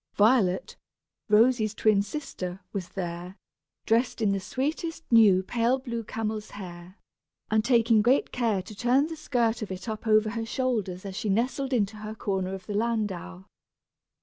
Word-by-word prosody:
Violet, 205 Hz, -4 st, +3 dB, 0.5 s
Rosy's 220 Hz, 0 st, +4 dB
twin 215 Hz, -2 st, +3 dB
sister, 195 Hz, -6 st, -5 dB
was 185 Hz, -4 st, -4 dB
there, 175 Hz, 0 st, -5 dB, 0.5 s
dressed 235 Hz, +3 st, +1 dB
in 215 Hz, -3 st, +2 dB
the 195 Hz, -, 0 dB
sweetest 305 Hz, -, -3 dB
new 205 Hz, -5 st, +6 dB
pale 235 Hz, +5 st, +1 dB
blue 235 Hz, -3 st, -5 dB
camel's 215 Hz, -1 st, -4 dB
hair, 180 Hz, -1 st, -10 dB, 0.5 s
and 215 Hz, 0 st, +3 dB
taking 230 Hz, -2 st, +4 dB
great 250 Hz, +5 st, +2 dB
care 225 Hz, -6 st, 0 dB
to 215 Hz, -, -10 dB
turn 245 Hz, +6 st, +2 dB
the 325 Hz, +1 st, -6 dB
skirt 240 Hz, -7 st, 0 dB
of 215 Hz, -, -4 dB
it 185 Hz, +4 st, -6 dB
up 220 Hz, +1 st, -5 dB
over 215 Hz, 0 st, +4 dB
her 230 Hz, 0 st, -3 dB
shoulders 215 Hz, -8 st, -2 dB
as 195 Hz, -1 st, -6 dB
she 215 Hz, +1 st, -2 dB
nestled 255 Hz, +6 st, 0 dB
into 215 Hz, -4 st, 0 dB
her 215 Hz, +1 st, -7 dB
corner 190 Hz, -3 st, -2 dB
of 190 Hz, -1 st, -10 dB
the 210 Hz, -, -5 dB
landau. 205 Hz, -, -2 dB
215 Hz, 160 wpm, -27 LUFS, 195-240 Hz, 0.5 s, new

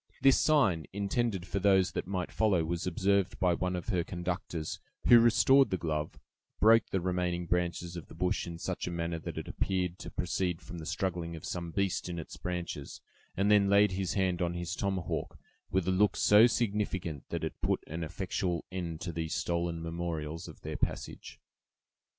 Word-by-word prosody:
This 135 Hz, -1 st, +5 dB
sign, 110 Hz, -, +3 dB
intended 100 Hz, -1 st, -1 dB
for 100 Hz, -, -2 dB
those 95 Hz, -2 st, +4 dB
that -, -, -4 dB
might 90 Hz, -2 st, -2 dB
follow, 100 Hz, -7 st, +2 dB
was 85 Hz, +2 st, -2 dB
observed 95 Hz, +2 st, +1 dB
by 90 Hz, -1 st, +3 dB
one 90 Hz, +1 st, -1 dB
of 90 Hz, +6 st, -5 dB
her 90 Hz, -5 st, +1 dB
conductors, 85 Hz, -3 st, -4 dB, 0.3 s
who 120 Hz, -, +9 dB
restored 125 Hz, +4 st, +5 dB
the 95 Hz, -, 0 dB
glove, 75 Hz, -3 st, -3 dB, 0.4 s
broke 115 Hz, +2 st, +5 dB
the 95 Hz, -, 0 dB
remaining 90 Hz, -1 st, -1 dB
branches 90 Hz, 0 st, -1 dB
of 85 Hz, -, -7 dB
the -, -, -13 dB
bush 90 Hz, 0 st, -1 dB
in 85 Hz, -1 st, -6 dB
such 90 Hz, +2 st, -3 dB
a -, -, -2 dB
manner 85 Hz, -1 st, -2 dB
that -, -, -7 dB
it -, -, -5 dB
appeared 90 Hz, -2 st, -1 dB
to -, -, -7 dB
proceed 90 Hz, -3 st, -1 dB
from 85 Hz, -, -9 dB
the 80 Hz, -, -7 dB
struggling 85 Hz, -3 st, -2 dB
of 80 Hz, -, -9 dB
some 85 Hz, -1 st, -4 dB
beast 95 Hz, 0 st, -1 dB
in 85 Hz, -, -4 dB
its 80 Hz, -, -7 dB
branches, 85 Hz, -5 st, -5 dB, 0.4 s
and 100 Hz, +2 st, +3 dB
then 100 Hz, -1 st, +5 dB
laid 100 Hz, 0 st, +5 dB
his 95 Hz, 0 st, -2 dB
hand 95 Hz, -2 st, +1 dB
on 85 Hz, 0 st, 0 dB
his 85 Hz, +1 st, -3 dB
tomahawk, 95 Hz, -4 st, -2 dB, 0.3 s
with 95 Hz, -1 st, 0 dB
a -, -, +3 dB
look 100 Hz, +2 st, +3 dB
so 105 Hz, +3 st, +7 dB
significant, 100 Hz, -, -2 dB
that -, -, -3 dB
it -, -, -4 dB
put -, -, 0 dB
an 80 Hz, +2 st, -5 dB
effectual 90 Hz, +1 st, -2 dB
end 85 Hz, -4 st, -4 dB
to 90 Hz, -, -3 dB
these 80 Hz, -1 st, -3 dB
stolen 85 Hz, 0 st, -1 dB
memorials 80 Hz, -1 st, -4 dB
of -, -, -12 dB
their -, -, -5 dB
passage. -, -, -4 dB
90 Hz, 190 wpm, -31 LUFS, 85-100 Hz, 0.4 s, who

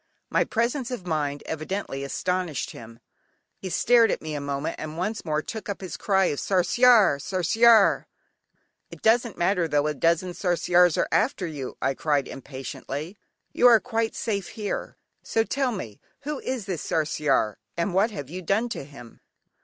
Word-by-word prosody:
My -, -, +3 dB
presence 240 Hz, +3 st, -1 dB
of 245 Hz, -8 st, -6 dB
mind 145 Hz, -4 st, -2 dB
evidently 160 Hz, -3 st, -4 dB
astonished 180 Hz, +1 st, -2 dB
him, 115 Hz, 0 st, -11 dB, 0.6 s
he 190 Hz, -, -5 dB
stared 230 Hz, +4 st, +4 dB
at -, -, 0 dB
me 155 Hz, -1 st, -6 dB
a 145 Hz, -, -3 dB
moment 140 Hz, +1 st, -3 dB
and 155 Hz, +1 st, -6 dB
once 210 Hz, +5 st, -2 dB
more 155 Hz, -2 st, -1 dB
took 220 Hz, -2 st, -7 dB
up 200 Hz, -, -3 dB
his 185 Hz, -, -6 dB
cry 195 Hz, -2 st, +2 dB
of 145 Hz, -, -1 dB
"Sarsiar, 200 Hz, -, +4 dB
sarsiar". 200 Hz, +5 st, +4 dB, 0.8 s
"It -, -, -13 dB
doesn't 230 Hz, 0 st, +3 dB
matter 175 Hz, -1 st, +1 dB
though 145 Hz, -1 st, +1 dB
a 150 Hz, -, 0 dB
dozen 170 Hz, +4 st, +1 dB
Sarsiars 175 Hz, -1 st, +3 dB
are -, -, +1 dB
after 220 Hz, -4 st, +1 dB
you," 145 Hz, -6 st, -6 dB
I 135 Hz, -, +2 dB
cried 145 Hz, -1 st, 0 dB
impatiently: 140 Hz, -, -7 dB, 0.4 s
"you 245 Hz, -, +5 dB
are 235 Hz, -2 st, +7 dB
quite 225 Hz, -2 st, -2 dB
safe 200 Hz, -4 st, -2 dB
here; 210 Hz, -3 st, -5 dB, 0.2 s
so 225 Hz, -, 0 dB
tell 265 Hz, +2 st, -1 dB
me 115 Hz, -, -7 dB, 0.2 s
who 290 Hz, 0 st, -4 dB
is 255 Hz, -6 st, -4 dB
this 185 Hz, -6 st, -3 dB
"Sarsiar," 150 Hz, -9 st, 0 dB, 0.2 s
and 170 Hz, +2 st, -1 dB
what 200 Hz, +5 st, +3 dB
have 145 Hz, -, -7 dB
you 185 Hz, +1 st, -5 dB
done 205 Hz, +7 st, 0 dB
to 225 Hz, -, -5 dB
him?" 135 Hz, -4 st, -14 dB
180 Hz, 170 wpm, -25 LUFS, 150-220 Hz, 0.8 s, are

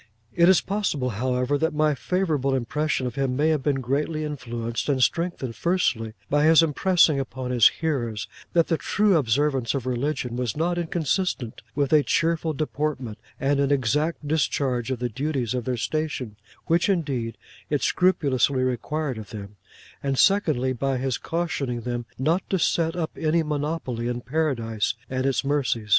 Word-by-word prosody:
It 170 Hz, 0 st, +5 dB
is 190 Hz, -, +5 dB
possible, 180 Hz, -11 st, -1 dB
however, 125 Hz, +5 st, 0 dB
that 160 Hz, -1 st, 0 dB
my 155 Hz, 0 st, +3 dB
favourable 150 Hz, -4 st, 0 dB
impression 140 Hz, +2 st, -1 dB
of 125 Hz, -, -3 dB
him 135 Hz, -1 st, -1 dB
may 150 Hz, +4 st, +2 dB
have 155 Hz, -3 st, +1 dB
been 135 Hz, -1 st, 0 dB
greatly 150 Hz, +5 st, -1 dB
influenced 120 Hz, -4 st, -4 dB
and 130 Hz, -3 st, +3 dB
strengthened, 165 Hz, -9 st, -1 dB
firstly, 125 Hz, -11 st, 0 dB
by 145 Hz, +1 st, +2 dB
his 160 Hz, +1 st, +7 dB
impressing 165 Hz, -1 st, +3 dB
upon 130 Hz, -1 st, -4 dB
his 120 Hz, -4 st, +7 dB
hearers 120 Hz, -10 st, -2 dB, 0.3 s
that 170 Hz, -1 st, +4 dB
the 165 Hz, -, 0 dB
true 205 Hz, -2 st, +2 dB
observance 135 Hz, -2 st, +1 dB
of 130 Hz, -3 st, -3 dB
religion 125 Hz, -1 st, -2 dB
was 125 Hz, -1 st, -2 dB
not 175 Hz, +2 st, 0 dB
inconsistent 165 Hz, -, -1 dB
with 145 Hz, 0 st, +1 dB
a 155 Hz, -, +7 dB
cheerful 165 Hz, +2 st, +1 dB
deportment 145 Hz, -6 st, -3 dB, 0.2 s
and 140 Hz, +1 st, +1 dB
an 140 Hz, -1 st, +2 dB
exact 145 Hz, +4 st, 0 dB
discharge 135 Hz, -5 st, 0 dB
of 130 Hz, -, -1 dB
the 125 Hz, +1 st, -2 dB
duties 130 Hz, -1 st, -2 dB
of 125 Hz, -2 st, -2 dB
their 125 Hz, -1 st, -1 dB
station, 140 Hz, -5 st, -2 dB, 0.3 s
which, 170 Hz, +2 st, +2 dB
indeed, 140 Hz, -11 st, -1 dB, 0.3 s
it 145 Hz, -2 st, 0 dB
scrupulously 140 Hz, -7 st, +2 dB
required 130 Hz, +1 st, -2 dB
of 105 Hz, -, -9 dB
them; 100 Hz, -1 st, -8 dB, 0.5 s
and 135 Hz, -1 st, -1 dB
secondly, 150 Hz, -11 st, +3 dB
by 135 Hz, +1 st, -1 dB
his 130 Hz, -1 st, -1 dB
cautioning 145 Hz, -8 st, -2 dB
them 120 Hz, 0 st, -4 dB
not 160 Hz, +8 st, +1 dB
to 190 Hz, -, +1 dB
set 165 Hz, -1 st, +1 dB
up 165 Hz, -3 st, -2 dB
any 160 Hz, +1 st, +1 dB
monopoly 145 Hz, -5 st, -2 dB
in 120 Hz, 0 st, -2 dB
Paradise 120 Hz, -6 st, -1 dB, 0.2 s
and 130 Hz, +1 st, 0 dB
its 130 Hz, -3 st, 0 dB
mercies. 125 Hz, -6 st, 0 dB
140 Hz, 165 wpm, -25 LUFS, 125-160 Hz, 0.5 s, his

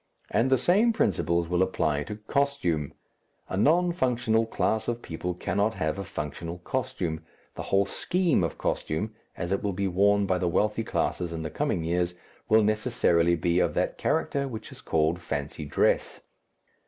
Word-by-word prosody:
And 125 Hz, +3 st, +2 dB
the 130 Hz, -, +5 dB
same 210 Hz, -, +3 dB
principles 85 Hz, -, +1 dB
will 90 Hz, +1 st, +1 dB
apply 75 Hz, -6 st, +1 dB
to 105 Hz, -, -5 dB
costume. 105 Hz, -, -1 dB, 0.6 s
A -, -, -2 dB
non 165 Hz, -, +3 dB
functional 120 Hz, -8 st, +1 dB
class 110 Hz, -1 st, 0 dB
of 120 Hz, 0 st, -2 dB
people 90 Hz, +2 st, -4 dB
cannot 100 Hz, +5 st, 0 dB
have 80 Hz, +5 st, -1 dB
a -, -, -2 dB
functional 85 Hz, +1 st, -5 dB
costume, 90 Hz, -6 st, -3 dB, 0.3 s
the -, -, -6 dB
whole 100 Hz, 0 st, +3 dB
scheme 170 Hz, -, +1 dB
of 85 Hz, -, -2 dB
costume, 105 Hz, +8 st, -2 dB, 0.2 s
as 85 Hz, 0 st, -3 dB
it 100 Hz, -, +1 dB
will 100 Hz, -1 st, -1 dB
be 100 Hz, +2 st, -1 dB
worn 100 Hz, +2 st, +3 dB
by 95 Hz, -1 st, +1 dB
the 90 Hz, -, 0 dB
wealthy 105 Hz, +5 st, +1 dB
classes 90 Hz, -5 st, -1 dB
in 80 Hz, -1 st, -4 dB
the 80 Hz, -, -4 dB
coming 85 Hz, -, -1 dB
years, 90 Hz, +1 st, 0 dB, 0.3 s
will 110 Hz, 0 st, +6 dB
necessarily 105 Hz, -6 st, +2 dB
be 85 Hz, +1 st, +1 dB
of 85 Hz, -4 st, +1 dB
that -, -, -1 dB
character 140 Hz, -1 st, 0 dB
which 115 Hz, -4 st, -7 dB
is -, -, -12 dB
called 80 Hz, +2 st, +1 dB
fancy 75 Hz, -2 st, -4 dB
dress. 70 Hz, -, +1 dB
95 Hz, 170 wpm, -27 LUFS, 85-115 Hz, 0.6 s, will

